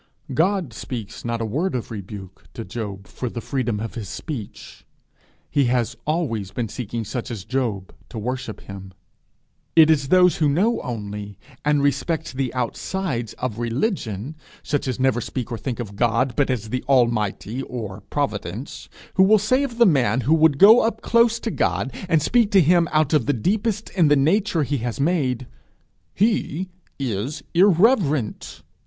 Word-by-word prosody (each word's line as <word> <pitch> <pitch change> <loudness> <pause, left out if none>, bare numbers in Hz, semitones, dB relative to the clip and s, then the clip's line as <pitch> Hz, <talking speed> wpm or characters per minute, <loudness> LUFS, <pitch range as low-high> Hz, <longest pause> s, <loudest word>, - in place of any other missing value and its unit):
God 170 - +1
speaks 115 -1 -7
not 115 -1 -2
a - - -1
word 150 - -1
of 120 - -4
rebuke 100 -2 -9
to 115 - -6
Job 100 -4 -6
for 125 - -5
the 115 - -5
freedom 120 -4 -2
of 115 +1 -5
his 105 -6 -6
speech: 125 -10 -7 0.7
he 140 -2 +3
has 120 -1 0
always 130 - -1
been 115 +2 -3
seeking 115 0 -4
such 120 +5 -4
as 105 -6 -6
Job 115 -7 -2 0.2
to 115 - -8
worship 115 -1 -4
him. 95 -1 -10 0.8
It 160 -1 +7
is 145 -3 +2
those 180 +2 +5
who 150 -2 +2
know 200 +11 +2
only 105 -4 -6 0.3
and 150 -1 +2
respect 145 +3 0
the 130 -2 -2
outsides 125 - -2
of 120 -3 -4
religion, 120 - -2 0.3
such 145 -2 -1
as 130 0 -2
never 130 -2 +2
speak 125 +2 -5
or 115 - -2
think 125 -3 -4
of 105 -4 -6
God 120 +3 +1
but 145 -2 +1
as 115 -4 -2
the 130 - -2
Almighty 115 -2 +1
or 110 -6 -6
Providence, 110 - -4 0.3
who 190 - +7
will 215 +3 +6
say 215 +6 +2
of 260 -5 -3
the 235 - +6
man 130 - +3
who 140 +7 +2
would 160 -3 +4
go 220 - +7
close 235 +1 +2
up - - -16
to 225 - -1
God, 100 - -1 0.2
and 160 -3 +3
speak 235 -4 +3
to 195 - +7
him 170 +1 +4
out 155 -1 +2
of 145 -6 +2
the 145 - +3
deepest 210 - -1
in 175 -5 +3
the 145 - +5
nature 165 +4 +2
he 145 +1 -1
has 120 +3 -4
made, 135 -6 0 0.7
'he 190 -4 0 0.3
is 130 +2 -3
irreverent.' 165 - +2
130 Hz, 170 wpm, -22 LUFS, 115-165 Hz, 0.8 s, It